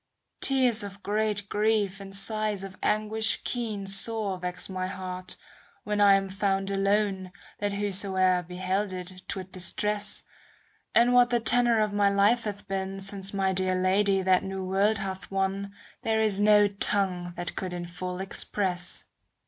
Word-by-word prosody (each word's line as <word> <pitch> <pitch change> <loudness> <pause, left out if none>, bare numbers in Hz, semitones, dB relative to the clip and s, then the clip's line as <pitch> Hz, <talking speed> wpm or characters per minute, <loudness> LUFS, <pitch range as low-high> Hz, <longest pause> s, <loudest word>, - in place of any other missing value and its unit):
Tears 255 -4 +3
of 200 -1 -8
great 210 -1 -1
grief 210 -2 0
and 195 0 -8
sighs 210 0 0
of 195 -1 -8
anguish 215 +1 0
keen 220 -5 -3
Sore 195 0 +2
vex 180 0 -3
my 185 -1 -3
heart, 185 -1 -6 0.5
when 210 0 -1
I 200 -1 +7
am 195 0 0
found 195 0 -1
alone, 195 -1 0 0.3
That 205 -1 -1
whosoe'er 190 -2 +2
beheld 185 +3 -3
it, 185 0 -7
'twould 190 -1 -4
distress: 205 +3 -2 0.7
And 240 +1 +5
what 245 0 +5
the 240 -1 +2
tenor 235 0 +3
of 210 -1 0
my 205 -1 +3
life 205 +4 +2
hath 205 -1 -6
been, 195 0 -3
^ - - -7
Since 195 0 0
my 195 -1 0
dear 185 0 0
Lady 190 +1 +2
that 185 -1 +3
new 190 -1 -5
world 200 +3 +2
hath 190 -1 -6
won, 195 +1 -2 0.3
There 220 0 0
is 215 -3 +4
no 210 0 +5
tongue 190 -3 0
that 175 -2 -5
could 185 -1 -4
in 175 -1 -5
full 180 +1 -6
express. 190 -2 -1
195 Hz, 160 wpm, -27 LUFS, 185-210 Hz, 0.7 s, I